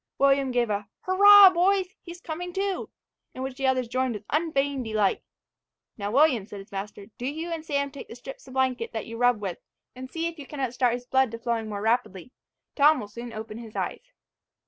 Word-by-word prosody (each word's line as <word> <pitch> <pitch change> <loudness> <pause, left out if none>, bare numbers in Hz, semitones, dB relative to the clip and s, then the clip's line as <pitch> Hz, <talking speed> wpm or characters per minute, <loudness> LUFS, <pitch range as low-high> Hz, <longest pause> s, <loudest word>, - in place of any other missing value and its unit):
William 275 -1 +3
gave 240 -3 +1
a 205 0 -2
"Hurra 400 +1 +8
boys! 370 +1 +2
he's 345 0 -10
coming 355 +2 -5
to," 390 0 -2 0.5
in 260 - -5
which 265 -1 -4
the 270 0 -1
others 255 -2 +1
joined 255 0 -1
with 210 - -7
unfeigned 285 -4 0
delight. 215 -3 0 0.7
"Now, 205 -1 -4
William," 250 -4 +3
said 210 - -9
his 195 - -13
master, 200 +1 -6
"do 245 - -3
you 320 +4 -4
and 325 -1 -4
Sam 280 -2 -1
take 280 -1 -9
the - - -10
strips 265 +2 -10
of 260 - -11
blanket 260 -3 0
that 220 - -4
you 230 0 -8
rub 245 -2 +3
with, 190 -4 -4 0.4
and 255 +1 -8
see 330 +3 -3
if 335 -1 -4
you 280 - -9
cannot 270 -5 -3
start 250 -2 +2
his 245 0 -8
blood 265 0 +2
to 230 - -6
flowing 230 -1 -2
more 205 -1 -4
rapidly. 225 -3 -1 0.4
Tom 295 0 +5
will 205 - -7
soon 235 +2 -8
open 220 0 -7
his 225 -2 -11
eyes." - - -4
260 Hz, 215 wpm, -26 LUFS, 230-310 Hz, 0.7 s, Hurra